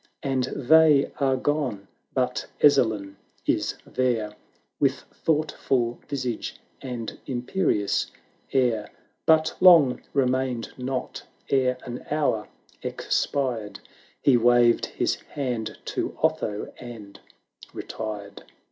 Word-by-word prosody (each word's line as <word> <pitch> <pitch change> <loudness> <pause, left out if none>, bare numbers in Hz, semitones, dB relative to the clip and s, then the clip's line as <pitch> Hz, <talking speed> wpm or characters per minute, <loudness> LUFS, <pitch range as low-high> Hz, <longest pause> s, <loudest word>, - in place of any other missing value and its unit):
.\nd 130 -2 +1
they 150 0 +5
are 135 -2 +2
gone 130 -8 -1
— - - -45
but - - 0
Ezzelin 110 -9 +3 0.3
is - - 0
there, 115 -5 -1 0.4
With - - +2
thoughtful 135 -6 0
visage 130 -5 -3 0.3
and 120 -4 -6
imperious 125 - 0 0.4
air: 120 -5 +1 0.4
But 160 0 +4
long 165 -8 +7
remained 130 -3 0
not; 130 0 -4 0.3
ere 130 -2 +2
an 120 0 -6
hour 145 -8 0 0.3
expired 120 -7 -1 0.4
He 135 -3 +5
waved 120 0 +4
his - - -1 0.2
hand 120 -6 -3
to - - -3
Otho, 155 -10 0
and 115 -5 -10 0.5
retired. 105 -2 -6
125 Hz, 100 wpm, -25 LUFS, 115-140 Hz, 0.5 s, long